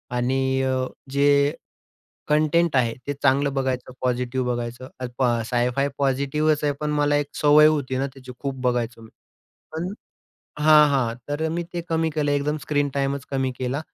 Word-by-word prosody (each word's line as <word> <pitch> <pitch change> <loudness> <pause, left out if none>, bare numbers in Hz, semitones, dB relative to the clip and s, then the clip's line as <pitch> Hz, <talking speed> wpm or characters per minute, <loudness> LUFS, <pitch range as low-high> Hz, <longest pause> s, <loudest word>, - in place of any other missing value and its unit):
आणि 130 +2 0 0.2
अ, 130 -1 0 0.3
जे 140 +1 +3 0.8
कंटेंट 155 +1 +2
आहे 120 -3 +2
ते 145 - -1
चांगलं 140 +1 +3
बघायचं, 130 -2 -2
पॉझिटिव्ह 125 0 -1
बघायचं. 120 +2 -6 0.6
साय-फाय 125 +3 +1
पॉझिटिव्हच 140 +3 +1
आहे, 145 - +2
पण 150 0 -1
मला 145 0 +2
एक 145 -1 0 0.2
सवय 150 +1 +7
होती 140 -4 +1
ना 135 - 0
त्याची, 130 -2 -11
खूप 135 -1 -3
बघायचो 120 -2 -1
मी, 110 - -14 0.6
पण 170 +4 -3 0.7
हां, 150 0 +6
हां. 125 -5 +1
तर 155 +2 -1
मी 170 +2 -2
ते 175 - -2
कमी 160 0 +1
केलं, 145 -2 0
एकदम 145 +1 0
स्क्रीन 145 -1 0
टाईमच 140 0 -1
कमी 135 -1 0
केला. 130 +3 -2
140 Hz, 155 wpm, -23 LUFS, 130-150 Hz, 0.8 s, सवय